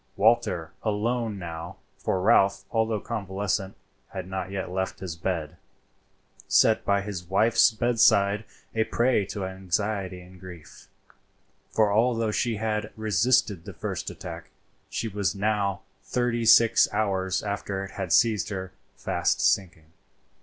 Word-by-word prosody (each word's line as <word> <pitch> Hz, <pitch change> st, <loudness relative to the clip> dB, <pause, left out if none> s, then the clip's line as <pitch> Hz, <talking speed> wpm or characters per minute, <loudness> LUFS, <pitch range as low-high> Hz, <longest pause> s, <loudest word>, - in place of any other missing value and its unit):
Walter, 95 Hz, -7 st, +2 dB
alone 110 Hz, +1 st, -1 dB
now,—for 85 Hz, +2 st, -5 dB
Ralph, 100 Hz, 0 st, +4 dB
although 110 Hz, -1 st, +1 dB
convalescent, 100 Hz, -2 st, -3 dB, 0.3 s
had -, -, -7 dB
not 95 Hz, -1 st, -4 dB
yet 95 Hz, -2 st, -4 dB
left 95 Hz, +1 st, -3 dB
his 90 Hz, -3 st, -5 dB
bed,—sat 85 Hz, +5 st, -2 dB
by 100 Hz, 0 st, +2 dB
his 95 Hz, -3 st, -6 dB
wife's 110 Hz, +6 st, +5 dB
bedside 110 Hz, -3 st, +3 dB, 0.3 s
a 110 Hz, -, +2 dB
prey 120 Hz, -5 st, +1 dB
to 100 Hz, -3 st, -4 dB
anxiety 95 Hz, 0 st, -2 dB
and 90 Hz, 0 st, -16 dB
grief; 90 Hz, -4 st, -12 dB, 0.8 s
for 105 Hz, -2 st, +2 dB
although 115 Hz, 0 st, +2 dB
she 115 Hz, +2 st, 0 dB
had 105 Hz, 0 st, -2 dB
resisted 110 Hz, -2 st, +2 dB
the -, -, -8 dB
first -, -, -4 dB
attack, -, -, -8 dB, 0.4 s
she 115 Hz, -, -3 dB
was 100 Hz, -1 st, -1 dB
now, 100 Hz, -2 st, 0 dB, 0.2 s
thirty 120 Hz, -2 st, -1 dB
six 115 Hz, 0 st, +6 dB
hours 95 Hz, -3 st, 0 dB
after 100 Hz, -1 st, -3 dB
it 95 Hz, -, -11 dB
had 95 Hz, -3 st, -5 dB
seized 105 Hz, +5 st, +3 dB
her, 95 Hz, -2 st, -5 dB, 0.3 s
fast -, -, 0 dB
sinking. 85 Hz, -5 st, 0 dB
100 Hz, 125 wpm, -26 LUFS, 95-110 Hz, 0.8 s, six